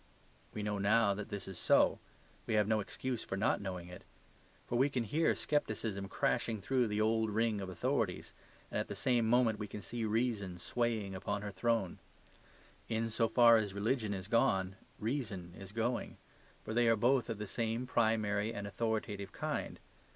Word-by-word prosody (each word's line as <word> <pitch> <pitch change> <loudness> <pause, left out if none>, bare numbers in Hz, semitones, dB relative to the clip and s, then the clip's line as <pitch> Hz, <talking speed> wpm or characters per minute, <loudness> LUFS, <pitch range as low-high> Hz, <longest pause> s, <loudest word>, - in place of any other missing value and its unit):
We 105 - -3
know 105 -1 -1
now 100 +1 +4
that 105 +1 -6
this 100 - -5
is 95 -2 -7
so; - - +4 0.5
we 110 - +1
have 105 -1 +3
no 110 0 +2
excuse 120 +3 -3
for 95 - -4
not 110 +2 +1
knowing 90 -3 -5
it. 90 0 -10 0.6
For - - -3
we 135 +4 +4
can 130 -4 -1
hear 155 +10 +2
scepticism 110 -9 -1
crashing 115 +2 0
through 125 +4 +1
the 105 0 -1
old 110 0 +2
ring 110 -1 +1
of 95 - -5
authorities, 90 - -1 0.4
and - - -1
at - - -2
the - - -5
same 120 -3 +2
moment 115 -3 +3
we 105 - -4
can 105 - -8
see 120 -1 -4
reason 110 -4 0
swaying 110 0 -1
upon 100 +2 -3
her 105 - -4
throne. 100 -1 0 0.9
In 115 0 -1
so 115 +1 +2
far 115 0 +7
as 105 -3 -2
religion 110 +1 0
is 95 -2 -4
gone, 95 -4 +2 0.2
reason 105 -8 -3
is 95 0 -10
going. 115 +3 -2 0.5
For 110 - -5
they 120 +1 +3
are 115 - +5
both 120 +3 +2
of 115 - -2
the 105 - -4
same 115 +3 -2
primary 110 -3 +1
and 100 -3 -5
authoritative 105 -2 -2
kind. - - -3
110 Hz, 180 wpm, -34 LUFS, 100-115 Hz, 0.9 s, far